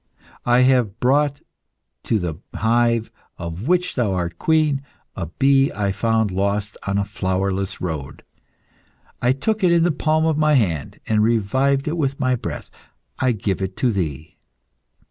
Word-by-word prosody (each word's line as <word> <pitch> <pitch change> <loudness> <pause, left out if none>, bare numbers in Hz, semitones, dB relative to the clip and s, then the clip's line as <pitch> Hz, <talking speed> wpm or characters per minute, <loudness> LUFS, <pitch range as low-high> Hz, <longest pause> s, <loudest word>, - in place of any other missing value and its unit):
I 120 +1 +5
have 125 -5 +2
brought 140 +2 +2 0.6
to 110 - +1
the 85 -5 -3 0.2
hive, 115 0 +1 0.3
of 85 - -6
which 180 +1 +2
thou 115 -7 0
art 90 -1 -3
queen, 155 -3 +2 0.3
a 85 - -4
bee 135 - +3
I 100 -1 -1
found 110 0 +1
lost 100 +2 -1
on 100 0 0
a 100 - +1
flowerless 95 -1 -2
road. 80 -6 -5 1.0
I 125 - +3
took 210 +11 -1
it 180 - +5
in 170 -1 +4
the 175 - +3
palm 155 +1 +1
of 160 -2 +1
my 155 0 +3
hand, 85 - 0
and 110 -1 +2
revived 130 +6 +1
it 160 +3 -1
with 140 -3 -1
my 130 0 +2
breath. 125 - -5 0.5
I 130 -1 +2
give 100 -3 -2
it 95 0 -4
to 125 - +2
thee." 80 -6 -4
115 Hz, 160 wpm, -21 LUFS, 95-140 Hz, 1.0 s, I